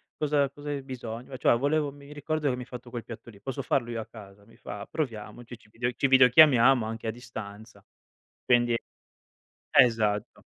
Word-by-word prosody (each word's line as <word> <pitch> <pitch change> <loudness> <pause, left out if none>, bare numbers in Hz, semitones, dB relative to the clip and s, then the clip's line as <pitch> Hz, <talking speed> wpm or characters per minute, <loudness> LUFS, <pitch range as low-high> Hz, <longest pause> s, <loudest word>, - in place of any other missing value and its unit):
"Cosa 145 -2 +1
cosa 145 +1 -9
hai 145 -1 -3
bisogno?", 125 -1 -7
"Cioè 120 - +3
volevo 145 +2 0
mi 140 +1 -13
ricordo 150 +1 -2
che 125 - 0
mi 125 - -7
hai - - -7
fatto 125 -1 -10
quel 120 -1 -6
piatto 115 0 -10
lì, 100 -3 -16
posso 135 +4 -4
farlo 125 -2 -1
io 115 -1 -4
a 110 - -5
casa?". 100 -2 -14
Mi 115 - -20
fa 105 0 -8
"Proviamoci!", 120 -3 -5
ci 110 - -24
video 120 +3 -2
ci 125 +3 0
videochiamiamo 130 -2 +6
anche 115 +1 -5
a - - 0
distanza. 110 -3 -10 0.6
Quindi 120 -1 +3 1.0
esatto, 110 -4 +2
120 Hz, 180 wpm, -27 LUFS, 110-135 Hz, 1.0 s, videochiamiamo